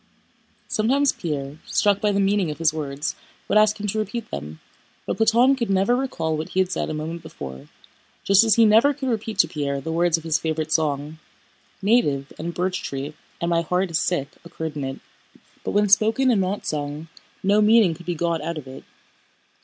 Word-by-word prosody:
Sometimes 270 +6 +2
Pierre, 145 -3 -5
struck 205 -1 +2
by 210 - +2
the 200 - 0
meaning 195 -3 +2
of 150 - -5
his 165 -2 +2
words, 145 -1 -3 0.3
would 215 - +4
ask 215 0 +3
him 205 - -4
to 210 +1 -1
repeat 230 +2 -4
them, 75 +2 -6 0.5
but - - -2
Platón 235 +4 +4
could 235 -5 -3
never 195 +5 +3
recall 170 -12 -2
what 155 +1 -4
he 190 - -1
had 185 -1 +1
said - - -2
a - - -3
moment 160 +2 -5
before, 65 - -9 0.6
just 195 +2 +6
as 220 -2 +4
he 230 - +6
never 225 +7 +5
could 270 -2 -3
repeat 220 -2 -3
to 165 - +5
Pierre 140 -3 -2
the 160 +4 -5
words 170 0 +2
of 165 - -9
his 160 -2 +1
favorite 160 -1 -2
song: 150 0 -1 0.6
native 150 - +2
and 170 +2 -4
birch 185 0 -1
tree 140 +2 -5 0.3
and 170 - -1
my 170 0 +3
heart 180 +2 -1
is 165 - +1
sick 145 -6 -1
occurred 160 -2 -6
in 145 - -3
it, 135 0 -5 0.6
but - - -3
when 205 0 +2
spoken 220 +6 +4
and 210 -5 +2
not 190 +2 -2
sung, 150 +1 -4 0.4
no 205 +2 +4
meaning 210 -4 +5
could 175 +2 -13
be 175 - -1
got 170 0 -1
out 165 +1 -4
of 150 - -7
it. 130 0 -10
175 Hz, 205 wpm, -23 LUFS, 155-210 Hz, 0.6 s, just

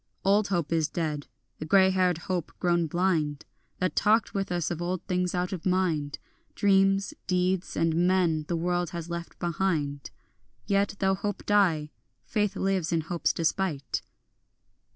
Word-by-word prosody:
Old 200 +1 +4
hope 175 -6 -1
is 160 -2 +2
dead, 150 -4 -3 0.3
the 155 - -4
grey 190 +3 +5
haired 185 -2 +2
hope 175 -1 -3
grown 175 -2 +2
blind 155 -4 0 0.3
That 185 - -1
talked 220 +2 +3
with 195 -2 -2
us 175 -2 -1
of 170 -1 -3
old 180 +1 -2
things 180 -1 -1
out 180 +1 -1
of 175 -4 -5
mind, 170 -6 0 0.4
Dreams, 195 0 +3
deeds 180 0 0
and 165 +2 +2
men 170 -5 +2
the 175 - -1
world 175 0 0
has 170 -1 -6
left 170 0 -6
behind; 160 -5 -1 0.6
Yet, 200 0 +1
though 190 -1 +2
hope 205 +1 -4
die, 170 -8 +2 0.3
faith 210 -2 0
lives 190 -4 0
in 165 -1 +2
hope's 170 +2 0
despite. 160 - -1
180 Hz, 150 wpm, -27 LUFS, 165-190 Hz, 0.6 s, grey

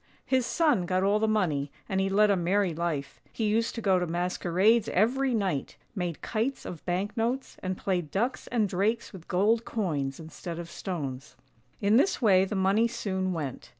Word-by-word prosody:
His 260 -2 +1
son 285 - +2
got 185 +1 +1
all 200 +2 +3
the 220 - +1
money, 160 -10 0 0.2
and 190 0 0
he 195 - +1
led 205 +1 +4
a - - +4
merry 185 +1 +1
life; 155 -4 -3
he 225 - -4
used 220 +2 +1
to 230 - -4
go 190 -2 +4
to 180 - -1
masquerades 180 +5 +2
every 250 +6 +2
night, 190 -10 -2 0.2
made 180 -6 -4
kites 235 +5 -2
of 170 - -7
bank 185 +5 -1
notes, 240 +3 -1
and 185 0 -3
played 180 -5 -1
ducks 235 - -1
and 225 -4 +1
drakes 205 +6 -1
with 180 -3 -11
gold 215 +6 +2
coins 150 - -2
instead 165 +1 -7
of 170 0 -7
stones. 145 -7 -5 0.5
In 205 +2 +4
this 360 +9 +3
way 195 -5 +5
the 205 - -4
money 195 +4 +3
soon 190 -4 -2
went. 145 -8 -5
190 Hz, 185 wpm, -28 LUFS, 175-220 Hz, 0.5 s, way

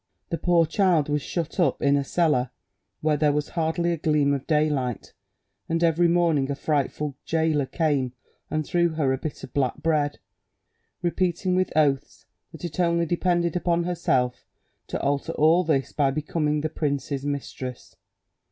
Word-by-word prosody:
The 165 - -1
poor 175 -2 +3
child 170 -4 +2
was 145 0 0
shut 170 +5 -4
up 175 - +2
in 140 0 +3
a 140 - +1
cellar 145 -5 +1 0.5
where 155 -1 +2
there 150 0 +3
was 150 0 -1
hardly 170 +1 0
a 170 - -1
gleam 150 -2 +2
of 135 -2 -3
daylight, 150 -6 0 0.6
and 165 +1 0
every 170 +1 +4
morning 165 -5 +2
a 140 - -1
frightful 145 -1 -1
gaoler 160 -4 +1
came 140 -4 0 0.4
and 155 -1 -1
threw 170 +2 +2
her 140 -4 +1
a 130 - -2
bit 155 -1 -6
of - - -9
black 135 -3 +1
bread, 150 -3 +1 0.9
repeating 180 +1 0
with 185 0 +1
oaths 140 -3 +1 0.3
that - - -8
it 165 0 -6
only 170 -1 +2
depended 175 0 0
upon 170 -1 +1
herself 135 -8 0 0.4
to - - -3
alter 140 0 -1
all 160 +4 +4
this 145 -5 0
by 140 -2 +2
becoming 150 +1 -1
the 155 - -1
prince's 140 -2 -2
mistress. 135 -3 -5
155 Hz, 160 wpm, -25 LUFS, 140-170 Hz, 0.9 s, every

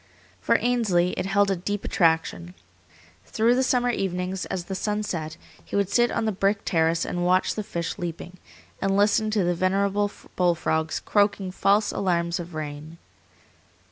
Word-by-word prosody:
For - - +3
Ainsley 205 -8 +1
it 185 - -3
held 200 0 +2
a - - +1
deep 205 +3 -4
attraction. 170 +1 0 0.7
Through 230 +2 +2
the 255 - +2
summer 245 -1 +2
evenings, 185 -2 -3
as 180 - -3
the 190 - -5
sun 210 +2 -2
set, 160 -5 -4 0.3
he - - -7
would 200 -1 +1
sit 240 0 +3
on 230 - -1
the 220 - +1
brick 200 +1 0
terrace 165 -1 +1
and 175 0 -2
watch 185 +1 +2
the 215 - -3
fish 170 -4 -4
leaping, 175 +1 -6 0.4
and 195 0 +1
listen 210 +2 +3
to 215 -2 +1
the 175 0 +1
venerable 200 +3 +1 0.3
bull 175 -2 +3
frogs 160 -1 -1
croaking 205 -2 +1
false 205 +2 +2
alarms 170 -1 0
of 175 -1 -8
rain. 155 +1 -6
190 Hz, 170 wpm, -25 LUFS, 175-205 Hz, 0.7 s, For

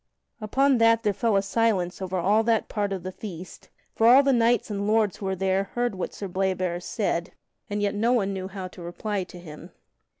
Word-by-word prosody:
Upon 265 +4 +2
that 230 0 +4
there 210 -2 +1
fell 225 +2 +1
a 195 - +2
silence 195 -4 0
over 185 0 -3
all 200 +5 +3
that 230 -1 +1
part 205 -2 -2
of 190 -3 -4
the 185 - -5
feast, 185 -3 -9 0.2
for 225 - +3
all 260 +4 +8
the 275 -1 +3
knights 235 -2 +2
and 200 0 -2
lords 215 -2 +2
who 195 - -5
were 190 - -1
there 190 +1 0
heard 240 -2 0
what 185 - -4
Sir 200 - -6
Bleoberis 185 -1 -2
said, 175 -5 -2 0.4
and 205 0 -2
yet 200 - 0
no 225 +3 +1
one 200 -5 +1
knew 190 -1 -4
how 190 -1 -6
to 180 - -13
reply 190 +3 -3
to 180 - -12
him. 155 -3 -11
200 Hz, 220 wpm, -25 LUFS, 185-225 Hz, 0.4 s, all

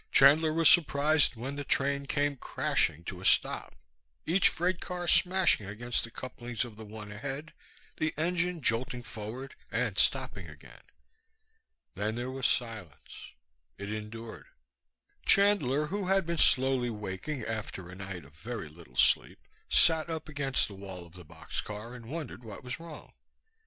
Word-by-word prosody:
Chandler 155 +4 +6
was 165 0 +4
surprised 150 -3 +4
when 130 +5 -5
the 145 - -3
train 140 0 +1
came 145 0 0
crashing 85 - 0
to 90 +1 -7
a - - -10
stop, - - +2 0.5
each 185 +4 +4
freight 180 +2 -1
car 180 -1 -4
smashing 180 - +4
against 120 +4 -2
the 115 - -6
couplings 120 0 -5
of 115 -3 -11
the 110 - -10
one 105 -1 -9
ahead, 140 +8 -6 0.4
the 155 0 0
engine 175 0 0
jolting 120 +2 +2
forward 120 +5 -7 0.2
and - - 0
stopping - - +1
again. - - -14 1.1
Then 105 +2 -2
there 120 +2 -3
was 130 -1 0
silence. 110 - -4 0.4
It 100 +1 -6
endured. 110 +1 -7 0.8
Chandler, 165 -9 +4
who 195 +4 -3
had 195 -1 +3
been 170 -1 -2
slowly 130 -1 +4
waking 105 +6 -5
after 105 -5 -5
a 90 - -10
night 95 -4 -7
of 70 - -18
very 110 +1 -6
little 75 -6 -16
sleep, - - +3 0.3
sat 160 0 +4
up 160 -2 -4
against 140 -3 +1
the 105 - -10
wall 95 -2 -9
of 85 - -17
the 90 -1 -11
boxcar 105 +8 -6
and 120 -2 -10
wondered 145 -4 -6
what 110 +1 -9
was 125 +3 -5
wrong. 165 -2 -11
125 Hz, 155 wpm, -30 LUFS, 105-155 Hz, 1.1 s, Chandler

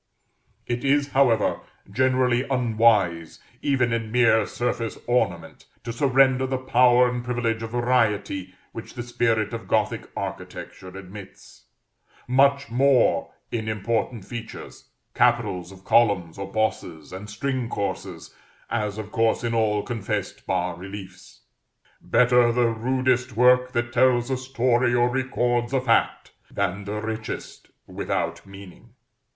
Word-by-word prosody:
It 120 0 -3
is, 140 +1 +2
however, 125 -6 +2 0.3
generally 130 +1 +2
unwise, 110 -9 +2 0.2
even 130 -4 +1
in 115 -2 -3
mere 115 -3 +3
surface 120 -2 -3
ornament, 100 -9 -1 0.2
to 115 - -5
surrender 130 0 +3
the 130 0 -1
power 125 -1 +4
and 125 0 -3
privilege 120 -2 -1
of 115 - -5
variety 110 -6 0 0.2
which 115 - -9
the 120 - -4
spirit 120 -3 0
of 115 0 -6
Gothic - - 0
architecture 95 - -7
admits; 95 +1 -12 0.6
much 140 +1 +3
more 135 +1 +3 0.2
in 110 -2 -3
important 110 0 -2
features 115 0 -9 0.2
capitals 90 0 +1
of 95 -1 -15
columns 100 -7 +2
or 100 0 -6
bosses, 90 -7 -2
and 100 +3 -8
string 125 +2 -3
courses, 100 - -5 0.4
as 105 -3 -2
of 110 -1 -7
course 115 0 +1
in 120 0 -1
all 105 -2 +1
confessed 115 -6 -4
bas 90 -1 -1
reliefs. 95 0 -10 0.6
Better 125 -1 +4
the 120 0 +2
rudest 125 +1 0
work 125 +1 +4
that 120 0 -2
tells 125 -1 +3
a 130 - 0
story 125 -1 +1
or 120 0 +3
records 120 -1 -1
a 135 - +3
fact, 120 -3 +1 0.2
than 100 0 -2
the 105 +1 -4
richest 110 0 -6 0.2
without - - -3
meaning. 95 -2 -14
115 Hz, 130 wpm, -24 LUFS, 105-125 Hz, 0.6 s, power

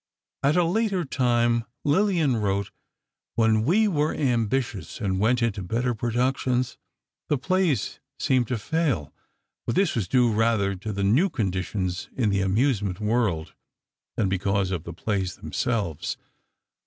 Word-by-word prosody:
At 145 +5 +3
a 175 - +5
later 190 0 0
time, 120 -3 +2 0.2
Lillian 160 - +2
wrote: 100 -2 -1 0.6
"When 110 -1 +3
we 210 - +4
were 155 -5 0
ambitious 120 - -1
and 95 -3 -1
went 120 +3 +2
into 110 -3 0
better 120 +7 -1
productions, 125 +2 0 0.5
the 150 - +2
plays 180 +1 0 0.2
seemed 130 -4 +2
to 125 - -1
fail." 140 - -1 0.5
But 115 - 0
this 195 - +2
was 105 -6 -1
due 125 -3 +3
rather 110 -3 +2
to 100 +3 -5
the 100 -1 -2
new 130 - +3
conditions 95 - -2
in 110 -6 +1
the 100 0 +1
amusement 100 -1 +1
world, 105 -7 0 0.6
than 105 - +2
because 95 0 0
of 90 -3 -3
the 85 - -6
plays 95 0 -2
themselves. 105 - -2
115 Hz, 140 wpm, -25 LUFS, 100-135 Hz, 0.6 s, a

